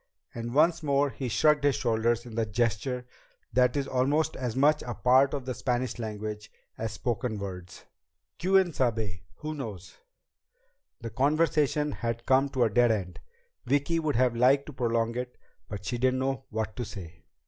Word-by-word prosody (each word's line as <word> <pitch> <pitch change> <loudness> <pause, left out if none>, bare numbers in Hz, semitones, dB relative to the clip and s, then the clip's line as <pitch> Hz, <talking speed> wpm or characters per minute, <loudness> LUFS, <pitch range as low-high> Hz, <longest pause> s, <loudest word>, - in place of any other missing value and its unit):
And 120 +1 -5
once 165 +3 +4
more 140 -1 +1
he 130 -1 -4
shrugged 150 +5 +3
his 145 -1 +3
shoulders 115 0 0
in 120 - -10
the 115 0 0
gesture 120 +4 -1 0.5
that 125 +3 +3
is 140 -1 -1
almost 145 +5 +1
as 125 -3 -3
much 150 +3 +4
a 120 -1 -5
part 130 +2 +4
of 135 -3 -5
the 130 - -2
Spanish 125 -1 -2
language 105 -1 -5 0.2
as 115 -1 -4
spoken 120 -2 -2
words. 95 -2 -8 0.5
"Quién 190 -1 +3
sabe? 110 -9 -1
Who 155 0 -5
knows?" 110 - -7 1.0
The 115 -1 -6
conversation 150 +2 +2
had 115 -2 -4
come 135 +2 +3
to 130 -2 +1
a 115 - +3
dead 120 +3 +4
end. 95 -5 -2 0.5
Vicki 145 +4 +1
would 155 -3 -1
have 125 0 +2
liked 135 +4 +4
to 150 - -9
prolong 115 -2 0
it, 125 0 -5 0.3
but 100 -1 -7
she 120 +5 -2
didn't 130 +1 +2
know 135 -2 -2
what 110 0 -3
to 125 - -2
say. 85 -7 -10
125 Hz, 170 wpm, -28 LUFS, 110-140 Hz, 1.0 s, once